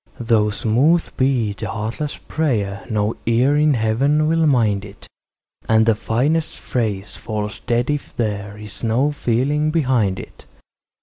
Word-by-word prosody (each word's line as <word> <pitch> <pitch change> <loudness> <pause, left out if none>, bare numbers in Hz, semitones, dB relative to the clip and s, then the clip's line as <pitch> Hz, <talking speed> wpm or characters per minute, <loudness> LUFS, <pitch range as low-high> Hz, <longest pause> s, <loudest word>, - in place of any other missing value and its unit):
Though 115 -3 +2
smooth 130 +11 +1
be 125 -6 +1
the 110 +2 -6
heartless 115 +7 -4
prayer, 105 -11 -2
no 105 0 0
ear 125 +5 +3
in 150 -1 +3
Heaven 135 +7 +2
will 165 0 +3
mind 110 -7 +2
it, 100 -1 -12 0.6
And 110 0 +5
the 115 - +4
finest 140 +10 0
phrase 105 -5 -3
falls 105 0 -4
dead 120 +4 0
if 145 -1 -4
there 100 -3 -3
is 105 -2 -10
no 120 +6 +2
feeling 145 +3 0
behind 125 - +1
it. - - -12
115 Hz, 140 wpm, -20 LUFS, 105-145 Hz, 0.6 s, And